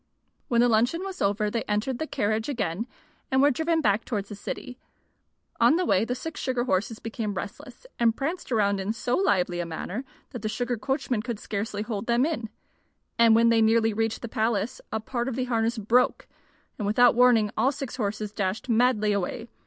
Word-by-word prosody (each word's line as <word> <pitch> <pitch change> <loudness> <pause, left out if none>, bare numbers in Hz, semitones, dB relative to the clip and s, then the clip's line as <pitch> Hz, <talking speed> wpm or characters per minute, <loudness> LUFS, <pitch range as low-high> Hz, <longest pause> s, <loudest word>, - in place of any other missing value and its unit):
When 235 -1 +3
the 245 - +5
luncheon 245 +10 +2
was 385 -1 -6
over, 210 +1 +1
they 230 - -1
entered 215 +5 -1
the 315 - -2
carriage 220 +2 -1
again 225 - -2 0.4
and 265 - +2
were 285 +2 +5
driven 320 +4 +1
back 205 -3 +2
towards 205 -4 -3
the 205 - -6
city. 250 +5 -7 0.8
On 300 - +5
the 360 +1 +1
way 200 - +3
the 250 - -2
six 320 +5 -6
sugar 255 -2 0
horses 215 -1 0
became 220 -2 -4
restless, 235 - -8
and 230 -1 +3
pranced 310 +1 -3
around 200 -3 +2
in 195 +3 -2
so 245 +2 -1
lively 180 - +1
a 175 - -1
manner 180 +8 -5 0.3
that 245 -5 -6
the 215 - -2
sugar 245 +2 -1
coachman 260 -1 -1
could 235 -1 -4
scarcely 205 0 -3
hold 215 -1 -4
them 240 +2 +3
in. 270 -9 -3 0.7
And 230 -1 +7
when 230 +1 +5
they 230 - +4
had 220 - +5
nearly 225 0 +3
reached 225 +2 -1
the - - -3
palace 225 0 -1
a 220 - -1
part 240 +2 -3
of 265 - -2
the 255 - -1
harness 230 -1 0
broke, 230 +4 +2 0.5
and 205 - -1
without 245 +3 +5
warning 235 -3 +4
all 265 - +3
six 270 -2 -6
horses 215 -2 -2
dashed 205 +4 -3
madly 230 -2 +3
away. 200 +4 -2
230 Hz, 200 wpm, -26 LUFS, 210-250 Hz, 0.8 s, And